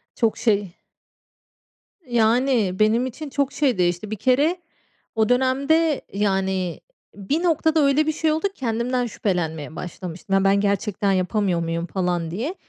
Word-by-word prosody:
Çok 225 -2 +1
şey. 205 -6 0 1.3
Yani, 235 -4 +2
benim 225 +4 +3
için 285 +4 -6
çok 280 0 -1
şey 265 -8 +1
değişti. 175 +4 0
Bir - - -1
kere 280 - +2 0.6
o 220 0 +2
dönemde, 275 +5 +2
yani, 190 -3 -1 0.4
bir 275 - -2
noktada 320 -1 +2
öyle 295 +3 +3
bir - - +3
şey 315 0 0
oldu 320 +6 0
ki 390 - -12
kendimden 245 +1 -1
şüphelenmeye 160 -8 -3
başlamıştım. 180 +3 -6
"Ya, 195 - +3
ben 195 +1 +4
gerçekten 200 0 0
yapamıyor 185 -1 0
muyum?" 165 0 -2
falan 175 -3 -2
diye. 260 - -3
215 Hz, 140 wpm, -22 LUFS, 190-270 Hz, 1.3 s, ben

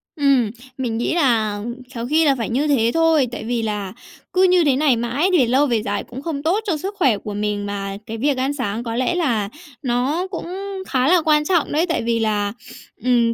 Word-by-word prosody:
Ừm, 275 -7 +3 0.3
mình 235 -4 -2
nghĩ 240 - 0
là 220 -9 +2 0.3
khéo 235 0 -4
khi 315 +4 +3
là 275 -2 +4
phải 230 -2 -3
như 275 +6 0
thế 235 -6 +3
thôi, 325 -5 +3
tại 240 - -6
vì 235 0 -1
là 210 -3 -3 0.4
cứ 370 - +4
như 365 -2 +5
thế 280 -4 +3
này 275 -3 +3
mãi 245 +10 0
về 250 - +3
lâu 265 +4 +3
về 235 -4 +1
dài 205 0 -2
cũng 255 +3 -9
không 290 -3 -4
tốt 355 +7 +2
cho 335 -5 +1
sức 390 +7 -5
khỏe 260 - +3
của 205 +1 -7
mình, 205 0 -2
mà 200 -1 -4
cái 225 - -6
việc 275 +3 +1
ăn 265 +2 0
sáng 235 -4 -3
có 230 -1 -4
lẽ 255 +7 0
là 235 - 0 0.3
nó 265 +9 0
cũng 345 - -5 0.4
khá 255 -1 +1
là 355 +1 +5
quan 300 -1 +3
trọng 345 -4 +1
đấy, 315 +4 +2
tại 325 - 0
vì 230 0 0
là, 205 -2 0 0.5
ừm, 240 -2 +3
250 Hz, 225 wpm, -21 LUFS, 225-300 Hz, 0.5 s, như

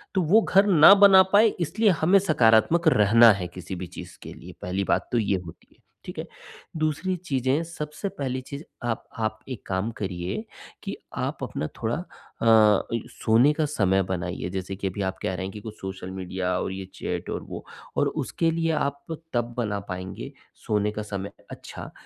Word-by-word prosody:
तो 190 - +3
वो 185 +7 +5
घर 195 +1 +4
ना 175 -1 +8
बना 195 -2 +8
पाए 215 +2 +7
इसलिए 210 +7 +2
हमें 180 +5 +5
सकारात्मक 155 - +3
रहना 115 -2 +6
है 90 -3 -4
किसी 90 +1 -6
भी 90 0 -6
चीज़ 90 - -10
के - - -8
लिए - - -12
पहली 95 +2 -2
बात - - 0
तो 120 - +1
ये 100 -3 +1
होती 80 - -13
है, - - -32 0.3
ठीक - - -7
है। - - -5 0.5
दूसरी 155 +4 -1
चीज़ें, 140 -3 0
सबसे 165 +3 -5
पहली 130 -5 -4
चीज़ 140 +3 -8 0.2
आप 120 -2 -2 0.2
आप 110 -1 -2
एक 125 - -7
काम 95 +3 -1
करिए, 90 -2 -4 0.4
कि - - -4 0.2
आप - - -3
अपना 75 - -3
थोड़ा 115 +1 0 0.5
अ, 110 -3 +5
इ 115 - +1
सोने 115 +6 +3
का 155 0 0
समय 100 -10 +1
बनाइए 90 -1 -4
जैसे 95 0 -4
कि 100 - -2
अभी 95 +2 -4
आप 95 0 -3
कह - - -2
रहे 95 - -4
हैं 95 - -5
कि 105 - -7
कुछ 110 0 -8
सोशल 95 -1 -6
मीडिया 95 -1 -4
और - - -3
ये 95 0 -6
चैट - - -4
और - - -4
वो, - - -8 0.3
और - - +3
उसके 165 -1 -1
लिए 165 0 0
आप 140 -2 -2 0.3
तब 120 0 -1
बना 105 -4 -1
पाएँगे, 95 0 -6 0.2
सोने 105 0 -1
का 105 - -5
समय 100 -1 -5 0.2
अच्छा, - - -9
110 Hz, 195 wpm, -25 LUFS, 95-155 Hz, 0.5 s, ना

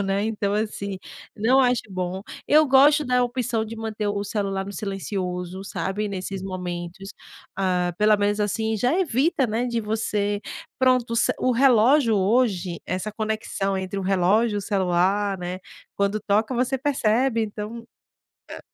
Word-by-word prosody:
legal, - - +1
né, 195 +1 0
então 210 -2 -1
assim, 200 -2 -3 0.4
não 245 +6 +4
acho 250 -2 +2
bom. 185 0 -3 0.3
Eu 310 +1 +6
gosto 290 +3 +5
da 250 -1 +2
opção 240 -2 -1
de 225 +1 -8
manter 220 -1 -3
o 205 0 -2
celular 195 -2 -2
no 200 - -7
silencioso, 190 -2 -4
sabe, 205 +2 -3
nesses 190 0 -5
momentos. 180 0 -6 0.5
Ah, 180 -2 0
pelo 210 0 +5
menos 205 +1 0
assim 220 +2 0
já 250 - +1
evita, 280 -4 +1
né, 230 +3 -1
de 235 -1 -1
você 210 -1 -1 0.4
pronto, 255 -2 +2
o - - 0
ce 230 - +3
o 255 - +1
relógio 250 0 +4
hoje, 195 -4 +1
essa 185 +3 -3
conexão 215 -2 -2
entre 190 +1 -4
o - - -3
relógio 195 +4 +2
e - - 0
o - - -2
celular, 195 0 +1
né, 180 +1 -5 0.4
quando 200 +1 0
toca, 215 +4 +1
você 255 +2 0
percebe, 255 -3 +1
então 220 +2 -6 0.6
é - - -8
210 Hz, 160 wpm, -24 LUFS, 195-235 Hz, 0.6 s, Eu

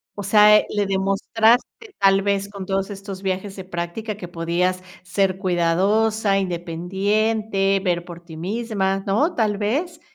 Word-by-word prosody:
o 205 - -5
sea, 210 +1 +6
eh, - - +1
le 205 -1 0
demostraste, 220 - +1
tal 195 0 +4
vez, 200 0 0
con 200 -2 -7
todos 195 +1 -1
estos 195 -1 -8
viajes 190 +1 -3
de 190 - -7
práctica, 185 +4 -5
que 175 - -7
podías 175 +2 -1 0.2
ser 190 0 0
cuidadosa, 195 +4 +1
independiente, 195 +3 0
ver 175 -2 0
por 175 -1 -10
ti 160 -2 -11
misma, 195 0 -2
¿no? 280 - +2
¿Tal 210 -3 +1
vez? 310 - -2
195 Hz, 150 wpm, -22 LUFS, 185-210 Hz, 0.2 s, sea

